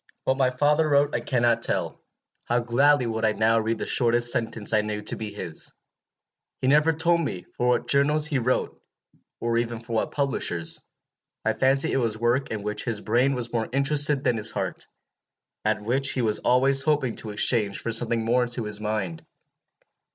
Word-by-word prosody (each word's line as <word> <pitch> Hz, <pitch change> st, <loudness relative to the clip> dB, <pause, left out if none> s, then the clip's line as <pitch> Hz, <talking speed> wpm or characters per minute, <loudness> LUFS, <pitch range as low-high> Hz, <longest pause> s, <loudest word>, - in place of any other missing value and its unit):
"What 130 Hz, -, +1 dB
my 130 Hz, -2 st, +2 dB
father 150 Hz, +4 st, +1 dB
wrote 145 Hz, 0 st, +2 dB
I -, -, 0 dB
cannot 120 Hz, -2 st, +1 dB
tell. -, -, -2 dB, 0.4 s
How 120 Hz, -, 0 dB
gladly 125 Hz, +3 st, +3 dB
would 110 Hz, -1 st, -3 dB
I 110 Hz, -1 st, +2 dB
now 110 Hz, +1 st, +2 dB
read 110 Hz, +1 st, -1 dB
the -, -, -4 dB
shortest 120 Hz, 0 st, +2 dB
sentence 115 Hz, -2 st, -1 dB
I 110 Hz, -, +4 dB
knew 105 Hz, 0 st, -4 dB
to -, -, 0 dB
be 110 Hz, -2 st, -6 dB
his! 85 Hz, -6 st, -5 dB, 0.9 s
He -, -, -4 dB
never 150 Hz, +4 st, +4 dB
told 170 Hz, +2 st, +1 dB
me 90 Hz, -, -4 dB
for 125 Hz, -, -1 dB
what 120 Hz, -1 st, +1 dB
journals 145 Hz, +3 st, +3 dB
he 150 Hz, -3 st, 0 dB
wrote, 125 Hz, +1 st, -1 dB, 0.6 s
or 115 Hz, 0 st, 0 dB
even 120 Hz, 0 st, -3 dB
for 115 Hz, +1 st, -9 dB
what 110 Hz, -, 0 dB
publishers. 135 Hz, -, -1 dB, 0.6 s
I -, -, +2 dB
fancy 135 Hz, +1 st, +2 dB
it -, -, 0 dB
was 115 Hz, -4 st, 0 dB
work 120 Hz, +4 st, 0 dB
in 110 Hz, -2 st, -4 dB
which 105 Hz, 0 st, -3 dB
his 115 Hz, -4 st, -1 dB
brain 125 Hz, +6 st, +1 dB
was 120 Hz, -1 st, -4 dB
more 115 Hz, -1 st, -1 dB
interested 140 Hz, +1 st, +3 dB
than 120 Hz, -, +1 dB
his 110 Hz, -, +3 dB
heart, -, -, -4 dB, 0.8 s
and 105 Hz, -, -1 dB
which 135 Hz, +4 st, +2 dB
he 125 Hz, -, -1 dB
was 110 Hz, -2 st, +1 dB
always 135 Hz, +2 st, +3 dB
hoping 145 Hz, -5 st, 0 dB
to 110 Hz, -, -6 dB
exchange 105 Hz, -1 st, 0 dB
for 115 Hz, -, -4 dB
something 115 Hz, 0 st, +1 dB
more 125 Hz, +2 st, +2 dB
to 120 Hz, -1 st, -3 dB
his 105 Hz, -1 st, -4 dB
mind. 105 Hz, -6 st, -3 dB
120 Hz, 190 wpm, -25 LUFS, 110-135 Hz, 0.9 s, I